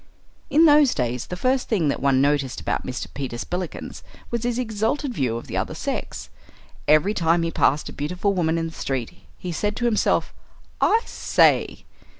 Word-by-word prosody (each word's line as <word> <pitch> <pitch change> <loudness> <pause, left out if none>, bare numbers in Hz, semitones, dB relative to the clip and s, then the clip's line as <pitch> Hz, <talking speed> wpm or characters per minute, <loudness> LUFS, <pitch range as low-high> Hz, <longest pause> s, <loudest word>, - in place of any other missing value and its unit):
In 320 +3 +5
those 295 -3 +6
days 125 -1 -2
the 180 - -5
first 255 +5 0
thing 180 -10 +2
that - - -2
one 135 -1 +3
noticed 140 -2 +1
about - - -3
Mr. 130 -1 -4
Peter 130 -4 -4
Spillikins 180 +6 -5 0.3
was 235 -1 -1
his 240 -1 0
exalted 245 +4 -1
view 125 - -1
of 115 - -8
the - - -6
other - - -2
sex. - - -5 0.6
Every 155 +7 +4
time 170 -2 +2
he 165 - -1
passed 150 -1 +2
a - - -8
beautiful 180 +7 -1
woman 165 -3 +1
in 165 - -1
the 165 - -5
street 135 -2 -3 0.2
he 180 - -5
said 205 +5 -1
to 240 - -2
himself, 225 -3 +1 0.5
"I 450 - +4
say!" - - +2
170 Hz, 180 wpm, -23 LUFS, 140-225 Hz, 0.6 s, those